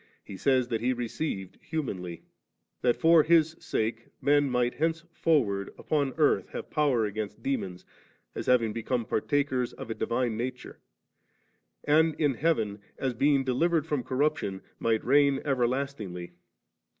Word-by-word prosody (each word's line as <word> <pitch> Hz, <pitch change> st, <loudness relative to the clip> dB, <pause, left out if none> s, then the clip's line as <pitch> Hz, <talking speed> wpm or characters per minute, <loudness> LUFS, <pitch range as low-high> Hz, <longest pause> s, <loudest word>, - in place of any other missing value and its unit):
He 100 Hz, -, -9 dB
says 130 Hz, +2 st, +2 dB
that 115 Hz, -2 st, -1 dB
He 125 Hz, +2 st, +1 dB
received 120 Hz, -, -4 dB
humanly 95 Hz, -, -4 dB
^; -, -, -28 dB, 0.6 s
that 120 Hz, -1 st, +3 dB
for 165 Hz, 0 st, +6 dB
His 160 Hz, 0 st, +3 dB
sake 115 Hz, +1 st, -2 dB
men 145 Hz, 0 st, +3 dB
might 125 Hz, -1 st, +1 dB
henceforward 160 Hz, -, 0 dB
upon 140 Hz, -4 st, -1 dB
earth 150 Hz, -3 st, +2 dB
have -, -, -7 dB
power 140 Hz, -7 st, +2 dB
against 105 Hz, 0 st, -5 dB
demons, 95 Hz, -10 st, -3 dB, 0.5 s
as -, -, -5 dB
having 115 Hz, -4 st, +3 dB
become 115 Hz, +1 st, -2 dB
par 110 Hz, -, 0 dB
takers 130 Hz, -3 st, 0 dB
of 115 Hz, -, -7 dB
a -, -, 0 dB
divine 120 Hz, 0 st, -1 dB
nature; 125 Hz, +3 st, -5 dB, 1.0 s
and 155 Hz, +1 st, +3 dB
in 145 Hz, -3 st, +3 dB
heaven, 115 Hz, -7 st, 0 dB, 0.2 s
as 130 Hz, -2 st, -1 dB
being 140 Hz, +3 st, +3 dB
delivered 155 Hz, +5 st, +1 dB
from 150 Hz, -4 st, -1 dB
corruption, 130 Hz, -8 st, -1 dB, 0.2 s
might 115 Hz, -1 st, 0 dB
reign 140 Hz, +1 st, +4 dB
everlastingly. 125 Hz, -9 st, -2 dB
130 Hz, 140 wpm, -28 LUFS, 115-145 Hz, 1.0 s, for